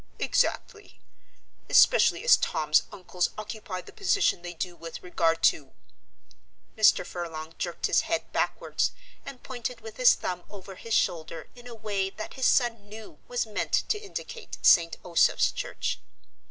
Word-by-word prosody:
"Exactly; 420 -3 -1 0.7
especially - - +5
as 485 - +7
Tom's 155 0 +2
uncles 180 -1 -2
occupy 215 -3 -6
the - - -15
position 400 - +1
they 175 0 -7
do 175 +1 -4
with 165 -1 -9
regard 165 -2 0
to 140 -4 +2 0.5
" - - -33
Mr. 215 -4 +4
Furlong 165 -3 -6
jerked 175 -1 -3
his - - +3
head 325 +1 -1
backwards - - -1 0.3
and 255 - -9
pointed 245 -2 -5
with 220 0 -10
his 250 -1 +6
thumb 180 -1 -4
over 195 -1 -10
his 225 +4 -3
shoulder 165 -1 -1
in 245 0 -14
a 240 - -9
way 200 -3 -2
that 215 +2 -8
his 260 -1 +1
son 230 -5 +1
knew 215 -7 -11
was 245 -1 -1
meant 215 -2 -4 0.2
to 420 - +1
indicate 440 +3 -8
St. 170 -2 +5
Osoph's 170 -2 +3
Church. - - -4
205 Hz, 155 wpm, -27 LUFS, 175-245 Hz, 0.7 s, as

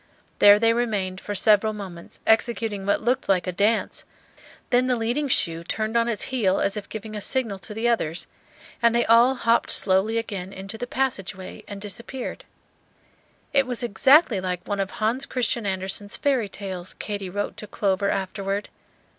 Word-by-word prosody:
There 205 0 +8
they 230 +1 +3
remained 205 -6 -2
for 205 - -5
several 215 +2 +4
moments 185 -5 -8
executing 220 -3 +1
what 205 - +1
looked 245 0 0
like 185 -3 +2
a 185 - -2
dance; 205 +5 0 0.7
then 250 +1 +3
the 250 - +2
leading 240 +6 -1
shoe 165 -9 +1
turned 215 +5 -3
on 235 0 +3
its 230 -3 -1
heel 195 -7 +2
as 200 - 0
if 210 - -6
giving 220 0 -7
a 210 - -4
signal 225 -4 0
to 195 - -8
the 225 +2 0
others, 175 -9 0 0.6
and 235 0 +4
they 235 - +3
all 235 +3 +5
hopped 230 -2 +2
slowly 195 +4 +4
again 195 -5 -4
into 195 +3 -7
the 245 +2 -5
passage 260 -9 -2
way 185 0 -10
and 200 -1 -7
disappeared. 235 +6 -4 1.1
It 275 -2 +3
was 250 -1 -3
exactly 240 - +4
like 180 -1 -4
one 205 -1 -2
of 195 -1 -1
Hans 230 +7 -1
Christian 235 -3 -1
Andersen's 195 +2 -3
fairy 260 -8 +1
tales, 185 -3 -7
Katy 200 -3 -5
wrote 205 +3 -3
to 210 - -8
Clover 200 -1 0
afterward. 195 +1 -2
210 Hz, 175 wpm, -24 LUFS, 195-235 Hz, 1.1 s, There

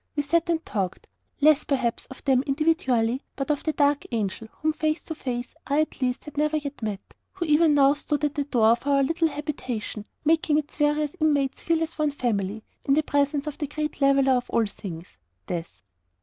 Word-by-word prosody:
We 290 - 0
sat 335 +4 +1
and 330 -1 0
talked 190 -4 -3 0.4
less, 305 0 +5
perhaps, 260 -5 -1
of 265 - -12
them 265 -2 +4
individually, 265 -5 +1
than 275 - -3
of 290 - -1
the 315 - +1
dark 290 -1 +2
Angel, 220 -1 -2
whom 310 0 -1
face 310 +1 -1
to 320 - -5
face 250 -5 -4
I 285 +2 +2
at 310 - -4
least 250 -1 0
had 300 -1 -10
never 305 +1 +2
yet 285 -3 -6
known 210 -3 -2 0.4
who 370 -3 -3
even 305 0 +4
now 275 0 +6
stood 295 0 -3
at 290 - -1
the 285 - -1
door 240 -6 +3
of 235 +4 0
our 280 -1 +4
little 330 +4 +2
habitation, 265 -8 -4 0.2
making 315 -1 +3
its 295 -1 -3
various 295 0 +2
inmates 290 -4 +1
feel 330 -1 +1
as 325 0 -6
one 305 -1 +3
family, 215 -6 -2 0.2
in 275 - +3
the 310 - +3
presence 285 0 +1
of 300 -2 -6
the 295 - -2
great 300 0 -4
leveller 275 -1 +4
of 245 -1 -1
all 230 - +2
things 180 -4 -8 0.3
Death. 165 - -6
285 Hz, 205 wpm, -25 LUFS, 245-305 Hz, 0.4 s, now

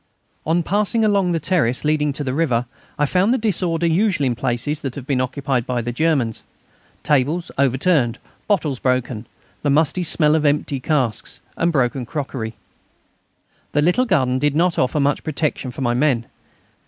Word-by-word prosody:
On 170 +2 +2
passing 210 +5 +1
along 200 -4 +2
the 165 - 0
terrace 150 -7 0
leading 150 -1 +2
to 145 - -4
the 130 -2 -2
river 130 -6 +1 0.3
I 145 - +2
found 185 +8 +2
the 260 - +3
disorder 180 -7 0
usual 175 -2 +2
in 125 - +1
places 125 +6 -2
that 135 -3 -4
have 135 - -7
been 135 -3 0
occupied 130 -1 -2
by 125 -2 -1
the 120 - -3
Germans; 130 -5 0 0.6
tables 150 +5 +1
overturned, 135 -2 +2 0.3
bottles 155 - 0
broken, 125 -3 -1 0.3
the 145 - 0
musty 155 +5 +2
smell 155 -3 +2
of 155 -1 +2
empty 145 -2 +1
casks, 130 -6 -1 0.2
and 170 +1 +1
broken 125 -4 0
crockery. 130 -6 -4 1.2
The 145 - +2
little 180 +10 +3
garden 130 - +1
did 145 +1 +1
not 170 +2 +2
offer 130 +4 +1
much 140 0 +1
protection 150 -3 -2
for 125 - -7
my 120 -2 +1
men. 125 -3 +1
145 Hz, 165 wpm, -20 LUFS, 130-165 Hz, 1.2 s, the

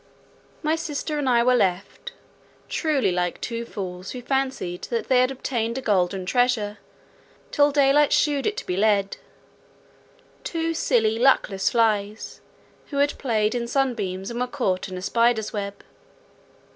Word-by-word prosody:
My 310 +1 +2
sister 305 -1 -3
and 275 -3 0
I 235 -1 +4
were 250 +1 +4
left—truly 235 - -2
like 180 0 -1
two 235 0 -4
fools, 185 -4 -6
who 250 -1 -7
fancied 260 -9 -2
that 235 -1 -3
they 255 -1 +5
had 255 - +3
obtained 240 -3 -2
a - - -3
golden 190 -4 0
treasure, 225 -2 +1 0.7
till 290 0 +4
daylight 285 +1 +4
shewed 290 -2 +2
it 425 - -2
to - - -5
be 180 - -2
lead—two 220 - -4
silly, 225 -8 +1
luckless 225 -7 +3
flies, 215 -2 0 0.5
who 280 - -5
had 285 +1 +1
played 220 -5 +1
in 240 -1 -2
sunbeams 220 -7 -1
and 235 - -4
were 250 - 0
caught 200 -9 -2
in 185 - -6
a 180 - -7
spider's 230 +1 +1
web. 200 -1 -5
235 Hz, 145 wpm, -24 LUFS, 200-270 Hz, 0.7 s, they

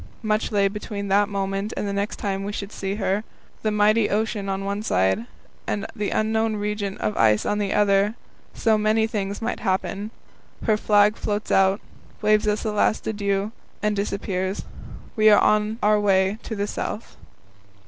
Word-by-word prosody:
Much 215 +1 0
lay 200 -2 +3
between 200 0 -5
that 205 +2 +3
moment 195 +1 -2
and 205 - -2
the 200 - -2
next 200 +1 -2
time 195 -1 -3
we 200 - -3
should 200 0 -5
see 195 -1 -3
her. 195 0 0 0.4
The 215 - +1
mighty 210 +1 +3
ocean 210 -1 -1
on 195 0 -2
one 200 +1 -2
side, 95 - +1 0.4
and 205 - -2
the 210 -1 -2
unknown 220 0 +1
region 205 -1 -3
of 105 - -2
ice 110 -2 +4
on 210 - 0
the 200 -2 -1
other; 205 +1 +3 0.4
so 220 -1 +2
many 215 +1 +2
things 205 -1 -3
might 235 - -2
happen. 195 +2 -1 0.6
Her 220 - +4
flag 210 0 +3
floats 210 0 -3
out, 195 +1 +4 0.4
waves 215 0 +3
us 210 +2 0
a 215 - 0
last 210 +1 +1
adieu, 200 -1 -1 0.3
and 210 0 +1
disappears. 195 -1 -2 0.5
We 215 0 +6
are 205 - +7
on 215 +1 +2
our 210 0 +4
way 195 0 +2
to 220 - -5
the 200 0 -1
South. 210 +1 -5
205 Hz, 175 wpm, -24 LUFS, 195-215 Hz, 0.6 s, are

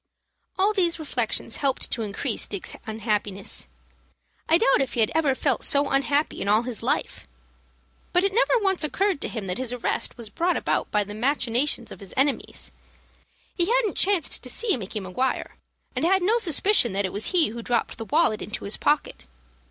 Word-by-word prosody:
All 400 +3 +3
these 350 -5 +2
reflections 245 -7 -1
helped 275 -2 0
to 230 - 0
increase 215 +4 -1
Dick's 200 -3 -3
unhappiness. 210 - -2 0.8
I 325 - +6
doubt 275 - +3
if 270 - -2
he - - -2
had 220 - +2
ever 295 -4 +2
felt 270 -1 0
so 280 0 +2
unhappy 280 +2 0
in - - -3
all 215 +3 +3
his 245 -2 -4
life. 245 +5 -2 0.8
But 360 0 +2
it 395 0 +1
never - - +3
once 385 -6 0
occurred 380 +2 0
to - - -2
him 220 -4 -5
that 180 +4 -3
his 255 -2 -2
arrest 250 0 -2
was 230 -3 -8
brought 350 +2 0
about - - -1
by 210 - +1
the 205 +1 -9
machinations 245 +1 0
of - - -10
his 200 -3 -11
enemies. 275 +1 -1 0.8
He 345 -1 +1
hadn't 465 -3 +1
chanced 375 -6 +3
to 250 - -6
see 450 - +1
Micky 215 -2 -5
Maguire, 205 +8 -2 0.4
and - - -2
had 375 +2 +3
no 445 +6 +3
suspicion 355 - +3
that 200 +1 0
it 185 - -4
was 205 - 0
he 350 - +4
who 235 +2 -7
dropped 235 0 -1
the 225 - -5
wallet 290 -6 +2
into 210 - -5
his 200 - -1
pocket. 290 - -1
265 Hz, 190 wpm, -25 LUFS, 220-340 Hz, 0.8 s, I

